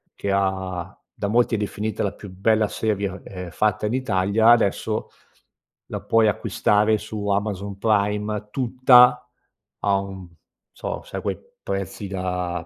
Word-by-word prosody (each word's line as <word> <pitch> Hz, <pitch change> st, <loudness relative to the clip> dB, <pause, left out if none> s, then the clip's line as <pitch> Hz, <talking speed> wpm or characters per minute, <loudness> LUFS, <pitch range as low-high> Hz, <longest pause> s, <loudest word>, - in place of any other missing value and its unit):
che 100 Hz, -, -3 dB
ha 95 Hz, -2 st, -1 dB, 0.2 s
da 100 Hz, -, -3 dB
molti 120 Hz, +2 st, +2 dB
è -, -, 0 dB
definita 105 Hz, +1 st, -3 dB
"la 100 Hz, -, -1 dB
più 100 Hz, -, -11 dB
bella 105 Hz, +3 st, +2 dB
seria, 100 Hz, -3 st, -2 dB
ehm, 90 Hz, -2 st, -7 dB
fatta 105 Hz, +2 st, 0 dB
in 110 Hz, -, -2 dB
Italia" 110 Hz, -2 st, +2 dB
adesso 110 Hz, -1 st, +1 dB, 0.8 s
la -, -, -3 dB
puoi 115 Hz, -1 st, +3 dB
acquistare 105 Hz, 0 st, +2 dB
su 105 Hz, -1 st, -6 dB
Amazon 100 Hz, -1 st, -2 dB
Prime 105 Hz, 0 st, 0 dB
tutta 125 Hz, 0 st, +5 dB, 0.6 s
a 100 Hz, -1 st, +3 dB
un 95 Hz, -2 st, -6 dB, 0.4 s
so, -, -, -5 dB
sai -, -, -6 dB
quei -, -, -2 dB, 0.3 s
prezzi 100 Hz, +1 st, -4 dB
da 90 Hz, -2 st, -3 dB
105 Hz, 140 wpm, -23 LUFS, 95-110 Hz, 0.8 s, tutta